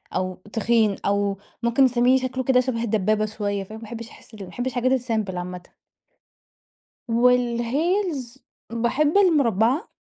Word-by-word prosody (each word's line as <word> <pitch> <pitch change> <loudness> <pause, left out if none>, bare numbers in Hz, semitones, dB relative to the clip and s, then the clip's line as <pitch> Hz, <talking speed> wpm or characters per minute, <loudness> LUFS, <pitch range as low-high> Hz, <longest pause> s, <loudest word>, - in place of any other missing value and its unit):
أو 185 0 -1 0.2
تخين 225 -2 +2
أو 200 0 0 0.3
ممكن 235 +3 +4
تسميه 250 +1 +3
شكله 260 0 -3
كده 255 0 +3
شبه 250 -2 -1
الدبابة 215 -1 +1
شوية 205 -2 -3
فاهم، 215 +3 -10
ما - - -12
باحبش 230 +1 -8
أحس - - -18
ال 215 - -12
ما - - -7
باحبش 245 +7 -4
الحاجات 255 +2 +1
الsimple 220 -6 -2
عامةً. 180 0 -5 1.5
والheels 250 - +1 0.3
باحب 260 +9 +1
المربعة 280 - +2
235 Hz, 140 wpm, -23 LUFS, 215-255 Hz, 1.5 s, ممكن